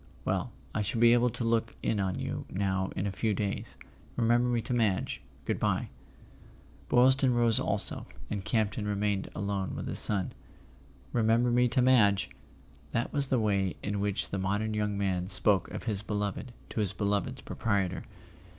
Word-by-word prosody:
Well, - - -1 0.2
I 110 - 0
shall 105 +2 -2
be 120 0 +7
able 120 0 +4
to 120 - -4
look 115 0 0
in 105 - 0
on 95 -2 -1
you - - -4
now 95 -1 -1
in 95 - -2
a 100 - -1
few 105 +2 -1
days. 100 0 -3 0.4
Remember 120 +1 +3
me 120 -1 +1
to - - -3
Madge. 100 - 0 0.2
Good - - -1
bye." - - 0 1.0
Boylston 130 0 +4
rose 120 -2 +4
also, - - -2 0.2
and 100 -2 -4
Campton 110 -1 0
remained 105 -1 -1
alone 100 -1 -2
with - - -5
his - - 0
son. 100 -3 +3 0.8
"Remember 115 +2 +3
me 125 +1 +4
to 125 +1 +2
Madge!" 100 - +4 0.6
That 120 - -1
was 140 -2 +2
the 130 - +2
way 100 -4 +1
in 100 - -2
Tvhich 100 -1 -1
the 100 - -2
modern 105 +3 -1
young 105 -1 -1
man 95 -3 -1
spoke 100 -1 +3
of - - -6
his 105 -4 -1
beloved 105 +3 -3 0.2
to - - -4
his 100 -2 +1
beloved's 100 -2 -1
proprietor. 100 -4 -1
105 Hz, 170 wpm, -30 LUFS, 100-115 Hz, 1.0 s, be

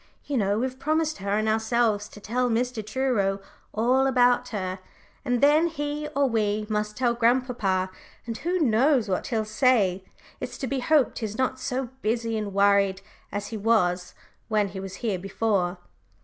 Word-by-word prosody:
You 285 - -3
know 205 -3 +1
we've 260 +2 -2
promised 310 -2 0
her 200 +1 -1
and 215 0 0
ourselves 220 -1 +1
to - - -12
tell 245 +4 -1
Mr. 240 0 -1
Truro 210 -4 0 0.3
all 255 +5 +2
about 250 -1 +3
her, 185 -3 -3 0.4
and 245 -3 0
then 300 +4 +5
he 295 -2 -3
or 280 0 +3
we 215 -3 0
must 210 0 -2
tell 245 -2 +2
grandpapa, 235 -6 +1 0.3
and 230 -1 -4
who 355 +4 -1
knows 255 -2 +3
what 185 -2 -1
he'll 225 -4 -1
say? 215 -5 +2 0.4
It's - - -6
to 270 - -3
be 270 +1 -2
hoped 290 +1 +2
he's 215 -1 -4
not 260 0 0
so 260 -2 -3
busy 230 +1 -1
and 210 -2 -3
worried 200 -1 +3 0.3
as 205 0 -4
he 225 - -4
was 180 -5 +1 0.3
when 210 -3 +1
he 190 +1 -7
was 190 0 -7
here 200 -5 0
before." 195 -1 -1
225 Hz, 170 wpm, -26 LUFS, 205-255 Hz, 0.4 s, then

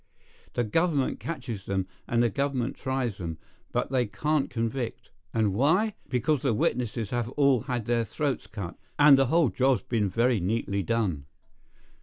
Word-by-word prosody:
The 120 - +1
government 145 +4 +1
catches 125 - -5
them 95 -1 0 0.2
and 120 0 +2
the 120 - +3
government 135 0 -1
tries 130 -6 -2
them, 85 -3 -4 0.3
but - - -1
they 125 -3 +2
can't 150 +7 0
convict; 115 0 -3 0.2
and 110 -4 +1
why?—because 150 - +1
the 125 -6 +1
witnesses 115 -1 -1
have 120 -1 -1
all 140 -3 +5
had 120 -4 -1
their 120 0 +1
throats 140 +5 -2
cut, 95 -4 -7 0.2
and 145 -1 +8
the 135 -1 +3
whole 160 0 +3
job's 130 +1 +2
been 115 -5 0
very 115 +4 +2
neatly 100 +1 -1
done. 90 -8 -1
120 Hz, 155 wpm, -27 LUFS, 110-135 Hz, 0.3 s, and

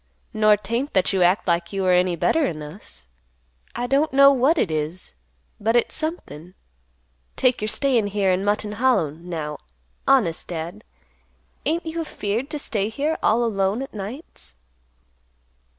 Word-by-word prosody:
Nor, 215 -1 +4
'taint 235 +8 -3
that 190 +1 +2
you 190 - +1
act 180 +3 +3
like 170 -1 0
you 195 -1 -2
were 185 - +3
any 180 0 +2
better'n 170 - 0
us. 150 - -11 0.7
I 245 - -2
don't 275 +5 +1
know 275 +1 +7
what 275 +6 +3
it 185 - +1
is, 155 +3 -4 0.5
but 225 +3 +1
it's 240 - +2
somethin'. 185 - -4 0.8
Take 255 -4 +2
your 215 - -1
stayin' 245 -3 +1
here 200 -2 +1
in 185 +1 0
Mutton 210 +1 0
Hollow, 220 - +2
now; 160 -2 -6 0.5
honest, 230 -12 +2
Dad, 170 0 -6 0.8
ain't 330 +3 0
you 325 +1 -3
afear'd 235 -3 -3
to 305 - -4
stay 210 -7 -2
here 290 +8 -2
all 230 +2 +3
alone 200 +2 0
at 270 - -10
nights?" 210 - -9
210 Hz, 150 wpm, -23 LUFS, 180-265 Hz, 0.8 s, know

